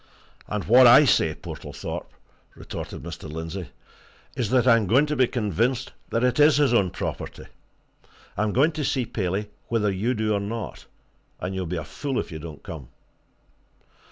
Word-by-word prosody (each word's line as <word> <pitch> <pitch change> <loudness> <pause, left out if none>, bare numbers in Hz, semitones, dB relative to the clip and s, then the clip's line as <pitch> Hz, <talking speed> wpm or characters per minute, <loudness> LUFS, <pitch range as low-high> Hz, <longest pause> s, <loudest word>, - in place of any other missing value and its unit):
"And 105 -2 -3
what 125 +3 +7
I 130 +5 +8
say, 80 - +3
Portlethorpe," - - -7 0.5
retorted - - -7
Mr. 80 -2 -8
Lindsey, 80 +1 -5 0.7
"is 115 -5 -1
that 125 0 +3
I'm 115 -4 +5
going 130 +9 +4
to 150 0 -2
be 130 -3 +4
convinced 120 +3 -1 0.2
that 115 - 0
it 125 +3 +2
is 150 0 +6
his 145 -5 +3
own 100 -6 +3
property! - - -5 0.9
I'm 105 +1 0
going 140 +9 +3
to 155 -1 -4
see 130 -2 0
Paley 105 0 -3 0.2
whether 105 -3 +1
you 110 +7 -1
do 110 -1 0
or 100 - +1
not 110 +3 -6 0.5
and 90 +1 -4
you'll 95 -2 -3
be 90 +1 -3
a 80 - -3
fool 135 - -3
if - - -5
you 80 - -6
don't 80 -2 -9
come." 75 -7 -8
110 Hz, 170 wpm, -25 LUFS, 90-125 Hz, 0.9 s, I